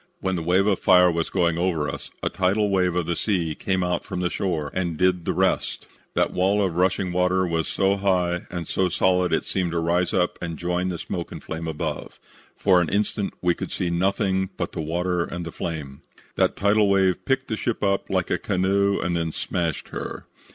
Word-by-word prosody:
When 95 Hz, -1 st, -1 dB
the 85 Hz, -, -2 dB
wave 90 Hz, +4 st, +3 dB
of 100 Hz, -3 st, +2 dB
fire 90 Hz, -1 st, +6 dB
was 85 Hz, -1 st, -1 dB
going 85 Hz, -3 st, +1 dB
over 85 Hz, -5 st, 0 dB
us, 70 Hz, -, -6 dB
a -, -, +1 dB
tidal 100 Hz, +2 st, +1 dB
wave 90 Hz, -2 st, +2 dB
of 90 Hz, -2 st, 0 dB
the 85 Hz, +1 st, -1 dB
sea 85 Hz, -5 st, 0 dB
came 95 Hz, +3 st, -1 dB
out 90 Hz, -1 st, -1 dB
from -, -, -5 dB
the 90 Hz, -1 st, 0 dB
shore 80 Hz, -7 st, -2 dB
and 85 Hz, -4 st, -2 dB
did 90 Hz, -1 st, +2 dB
the -, -, +1 dB
rest. -, -, 0 dB, 0.3 s
That -, -, +1 dB
wall 100 Hz, +2 st, +2 dB
of 90 Hz, -3 st, -2 dB
rushing 95 Hz, +1 st, +1 dB
water 90 Hz, +1 st, +2 dB
was 85 Hz, -2 st, -1 dB
so 100 Hz, 0 st, +1 dB
high 90 Hz, -3 st, 0 dB
and 85 Hz, -3 st, -5 dB
so 95 Hz, -1 st, +1 dB
solid 90 Hz, 0 st, +2 dB
that -, -, +4 dB
it -, -, -2 dB
seemed 90 Hz, -2 st, -1 dB
to 85 Hz, -, +1 dB
rise 85 Hz, +2 st, +1 dB
up 90 Hz, -1 st, 0 dB
and 85 Hz, -2 st, -4 dB
join 90 Hz, +1 st, -1 dB
the 90 Hz, -, -3 dB
smoke 85 Hz, +1 st, -5 dB
and -, -, -8 dB
flame 80 Hz, +1 st, -5 dB
above. 80 Hz, -1 st, -4 dB, 0.4 s
For 95 Hz, -3 st, +4 dB
an 85 Hz, -, -1 dB
instant 100 Hz, 0 st, -1 dB
we 90 Hz, -1 st, +4 dB
could -, -, -6 dB
see 90 Hz, -2 st, -1 dB
nothing 95 Hz, +1 st, +1 dB
but -, -, -2 dB
the -, -, -4 dB
water 90 Hz, +2 st, 0 dB
and 85 Hz, 0 st, -5 dB
the 85 Hz, -, -6 dB
flame. 75 Hz, -6 st, -5 dB, 0.3 s
"That -, -, +2 dB
tidal 100 Hz, +1 st, +3 dB
wave 95 Hz, -2 st, +2 dB
picked 135 Hz, 0 st, 0 dB
the 110 Hz, -, -1 dB
ship 115 Hz, 0 st, -2 dB
up 100 Hz, -1 st, +1 dB
like -, -, 0 dB
a -, -, +1 dB
canoe 100 Hz, +1 st, +1 dB
and 85 Hz, 0 st, -1 dB
then 85 Hz, -1 st, -1 dB
smashed 85 Hz, -1 st, -3 dB
her. -, -, -6 dB
90 Hz, 220 wpm, -24 LUFS, 85-95 Hz, 0.4 s, fire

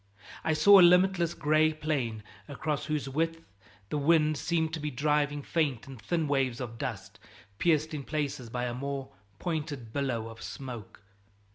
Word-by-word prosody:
I 160 Hz, -, +1 dB
saw 195 Hz, +6 st, +8 dB
a -, -, +9 dB
limitless 180 Hz, -1 st, +5 dB
gray 155 Hz, +1 st, +3 dB
plain, 135 Hz, -8 st, -2 dB, 0.2 s
across 150 Hz, 0 st, -3 dB
whose 150 Hz, -3 st, -2 dB
width 165 Hz, +4 st, -1 dB, 0.5 s
the 150 Hz, -, -1 dB
wind 155 Hz, +1 st, +3 dB
seemed 160 Hz, +1 st, -1 dB
to 165 Hz, -, -2 dB
be 150 Hz, 0 st, -2 dB
driving 145 Hz, +1 st, 0 dB
faint 145 Hz, -8 st, -1 dB
and 135 Hz, -5 st, -11 dB
thin 160 Hz, +7 st, -1 dB
waves 135 Hz, -4 st, 0 dB
of 115 Hz, -3 st, -6 dB
dust, -, -, -5 dB, 0.4 s
pierced 155 Hz, -1 st, +2 dB
in 150 Hz, -, -3 dB
places 145 Hz, -4 st, -3 dB
by 125 Hz, +1 st, -2 dB
a 120 Hz, -, -2 dB
more 135 Hz, +1 st, -4 dB, 0.3 s
pointed 145 Hz, -7 st, -4 dB
billow 130 Hz, -5 st, -1 dB
of 115 Hz, 0 st, -11 dB
smoke. 120 Hz, -7 st, -8 dB
145 Hz, 160 wpm, -29 LUFS, 130-160 Hz, 0.5 s, a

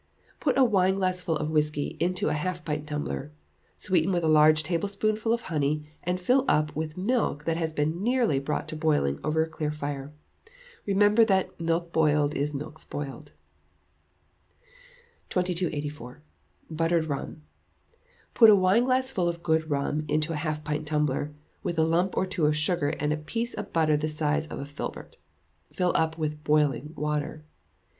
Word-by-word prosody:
Put 270 Hz, -4 st, +1 dB
a 270 Hz, -, +6 dB
wineglassful 185 Hz, -5 st, +1 dB
of 150 Hz, +1 st, -3 dB
whisky 150 Hz, -2 st, 0 dB
into 180 Hz, +2 st, 0 dB
a -, -, 0 dB
half 175 Hz, +2 st, -3 dB
pint 150 Hz, 0 st, -3 dB
tumbler; 75 Hz, -, -4 dB, 0.5 s
sweeten 185 Hz, -1 st, +1 dB
with 175 Hz, -2 st, 0 dB
a -, -, +2 dB
large 155 Hz, 0 st, +5 dB
teaspoonful 205 Hz, +6 st, -1 dB
of 235 Hz, 0 st, +1 dB
honey, 150 Hz, -3 st, -2 dB
and 180 Hz, +1 st, -1 dB
fill 250 Hz, +9 st, +3 dB
up 150 Hz, 0 st, +2 dB
with 155 Hz, +1 st, -4 dB
milk 200 Hz, -, 0 dB
that 165 Hz, +1 st, 0 dB
has 160 Hz, -1 st, -1 dB
been 155 Hz, +3 st, -1 dB
nearly 235 Hz, -, +2 dB
brought 145 Hz, +2 st, -3 dB
to -, -, -5 dB
boiling 150 Hz, -, +1 dB
over 160 Hz, +1 st, +2 dB
a -, -, -4 dB
clear 155 Hz, -1 st, -3 dB
fire. 145 Hz, -2 st, -5 dB, 0.8 s
Remember 205 Hz, +3 st, +5 dB
that 190 Hz, -5 st, 0 dB
"milk 165 Hz, +1 st, -1 dB
boiled 150 Hz, -2 st, +3 dB
is 145 Hz, +1 st, -2 dB
milk 150 Hz, +2 st, -6 dB
spoiled." 145 Hz, -3 st, -7 dB, 2.0 s
2284. 150 Hz, -7 st, -3 dB, 0.5 s
Buttered 165 Hz, +1 st, +1 dB
Rum. 150 Hz, +1 st, -5 dB, 0.9 s
Put 225 Hz, -2 st, +8 dB
a 210 Hz, -, +8 dB
wineglassful 230 Hz, +1 st, +2 dB
of 170 Hz, 0 st, -6 dB
good 160 Hz, -1 st, +1 dB
rum 145 Hz, +1 st, -1 dB
into 155 Hz, +2 st, 0 dB
a 150 Hz, -, -3 dB
half 155 Hz, -1 st, -3 dB
pint 150 Hz, 0 st, -3 dB
tumbler, 150 Hz, -1 st, 0 dB, 0.3 s
with 175 Hz, -5 st, -3 dB
a 160 Hz, -, +4 dB
lump 175 Hz, +4 st, +1 dB
or -, -, +2 dB
two 185 Hz, -5 st, 0 dB
of 150 Hz, 0 st, +1 dB
sugar 150 Hz, 0 st, +1 dB
and 150 Hz, +1 st, +1 dB
a -, -, -2 dB
piece 230 Hz, +10 st, -3 dB
of -, -, -6 dB
butter 155 Hz, -2 st, +3 dB
the 150 Hz, +1 st, -1 dB
size 155 Hz, 0 st, -1 dB
of -, -, -7 dB
a 140 Hz, -, -5 dB
filbert. 145 Hz, +1 st, -7 dB, 0.5 s
Fill 180 Hz, -1 st, +1 dB
up 160 Hz, 0 st, +1 dB
with 150 Hz, -1 st, -3 dB
boiling 150 Hz, -1 st, +1 dB
water. 150 Hz, +1 st, -3 dB
155 Hz, 165 wpm, -27 LUFS, 150-180 Hz, 2.0 s, Put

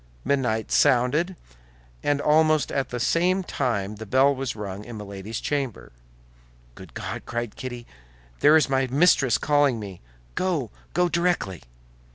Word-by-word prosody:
Midnight 120 Hz, -6 st, 0 dB
sounded, 145 Hz, +9 st, +3 dB, 0.7 s
and 145 Hz, -1 st, +1 dB
almost 155 Hz, 0 st, +3 dB
at 135 Hz, -1 st, -1 dB
the 120 Hz, -, -4 dB
same 180 Hz, +8 st, +2 dB
time 105 Hz, -, -2 dB
the 110 Hz, -, -7 dB
bell 135 Hz, +6 st, +4 dB
was 135 Hz, -3 st, -4 dB
rung 100 Hz, -1 st, -6 dB
in 115 Hz, 0 st, -9 dB
Milady's 105 Hz, +1 st, -6 dB
chamber. 140 Hz, -6 st, -3 dB, 0.8 s
"Good -, -, -14 dB
God," -, -, -6 dB
cried 120 Hz, -2 st, -4 dB
Kitty, 120 Hz, -2 st, -7 dB, 0.5 s
"there 150 Hz, +2 st, +6 dB
is 155 Hz, -, +2 dB
my 135 Hz, 0 st, +1 dB
mistress 135 Hz, -3 st, +3 dB
calling 145 Hz, -5 st, +2 dB
me! 100 Hz, -4 st, -8 dB, 0.3 s
Go; 165 Hz, -, -1 dB, 0.2 s
go 180 Hz, 0 st, +3 dB
directly!" 170 Hz, -, -1 dB
130 Hz, 140 wpm, -25 LUFS, 110-150 Hz, 0.8 s, there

